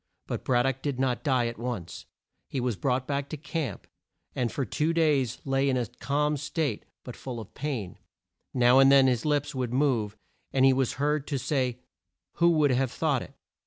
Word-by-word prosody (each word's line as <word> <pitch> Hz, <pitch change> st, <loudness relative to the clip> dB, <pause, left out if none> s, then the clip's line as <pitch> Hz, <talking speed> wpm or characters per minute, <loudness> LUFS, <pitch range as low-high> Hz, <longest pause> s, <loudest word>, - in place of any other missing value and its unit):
But 120 Hz, -4 st, -4 dB
Brad 120 Hz, -2 st, +2 dB
dock 135 Hz, -1 st, -1 dB
did 140 Hz, -3 st, -2 dB
not 130 Hz, -2 st, 0 dB
die 130 Hz, -5 st, +2 dB
at 115 Hz, -1 st, -4 dB
once. 115 Hz, -9 st, -5 dB, 0.4 s
He 135 Hz, -, -2 dB
was 125 Hz, -3 st, -1 dB
brought 130 Hz, +2 st, 0 dB
back 140 Hz, 0 st, -2 dB
to 155 Hz, -, -5 dB
camp, 160 Hz, -2 st, -4 dB, 0.5 s
and 120 Hz, -2 st, -1 dB
for 135 Hz, -, -2 dB
two 155 Hz, -, 0 dB
days 145 Hz, -7 st, +2 dB
lay 135 Hz, 0 st, +1 dB
in 130 Hz, -, +1 dB
a 125 Hz, -, 0 dB
calm 150 Hz, +6 st, -1 dB
state 150 Hz, -4 st, -2 dB, 0.2 s
but 125 Hz, -, -8 dB
full 125 Hz, -3 st, -6 dB
of 110 Hz, -, -10 dB
pain. 125 Hz, -, -4 dB, 0.5 s
Now 125 Hz, 0 st, +5 dB
and 135 Hz, 0 st, +7 dB
then 135 Hz, -1 st, +7 dB
his 125 Hz, -1 st, +1 dB
lips 145 Hz, 0 st, 0 dB
would 125 Hz, -3 st, -2 dB
move 120 Hz, -7 st, +1 dB, 0.3 s
and 135 Hz, 0 st, +3 dB
he 135 Hz, -, +6 dB
was 130 Hz, -2 st, 0 dB
heard 150 Hz, +1 st, 0 dB
to 140 Hz, -, -1 dB
say, 125 Hz, -2 st, -1 dB, 0.6 s
"Who 170 Hz, 0 st, +5 dB
would 155 Hz, -4 st, +3 dB
have 130 Hz, +1 st, +1 dB
thought 145 Hz, -5 st, 0 dB
it! -, -, -10 dB
135 Hz, 200 wpm, -27 LUFS, 125-145 Hz, 0.6 s, and